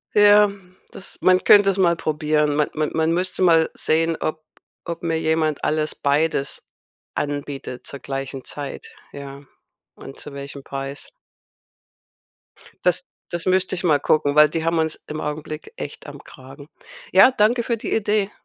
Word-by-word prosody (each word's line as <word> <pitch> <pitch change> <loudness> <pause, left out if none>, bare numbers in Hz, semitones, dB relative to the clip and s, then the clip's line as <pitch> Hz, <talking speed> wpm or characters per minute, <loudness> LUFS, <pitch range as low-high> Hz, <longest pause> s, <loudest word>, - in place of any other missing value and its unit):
Ja, 205 0 +6 0.4
das 190 - -7
man 185 0 +4
könnte 205 -1 +7
es 195 - 0
mal 175 -3 +3
probieren. 150 -2 0
Ma 150 0 +2
man 155 -1 -1
man 160 0 +1
müsste 185 +2 -1
mal 165 -3 +4
sehen, 165 +1 +1
ob 155 0 -3 0.4
ob 170 0 -6
mir 165 -1 0
jemand 160 -2 0
alles 155 0 0
beides 140 0 0 0.5
anbietet 145 -3 -4
zur 140 - -6
gleichen 135 -1 -5
Zeit, 145 -2 -7 0.2
ja, 140 0 -9 0.5
und 135 - -11
zu 145 - -9
welchem 140 0 -8
Preis. 135 +1 -6 1.7
Das - - +2 0.2
das 175 -1 -4
müsste 185 0 +1
ich 185 - -4
mal 155 -5 +3
gucken, 145 0 +1
weil 150 0 +8
die 160 +1 -3
haben 165 0 +1
uns 160 -1 -1
im 155 +1 -5
Augenblick 155 - -6
echt - - -7
am - - -10
Kragen. - - -13 0.4
Ja, 260 - +7
danke 235 +1 +2
für 235 - 0
die 225 - -5
Idee. 210 -2 +1
155 Hz, 155 wpm, -22 LUFS, 145-180 Hz, 1.7 s, weil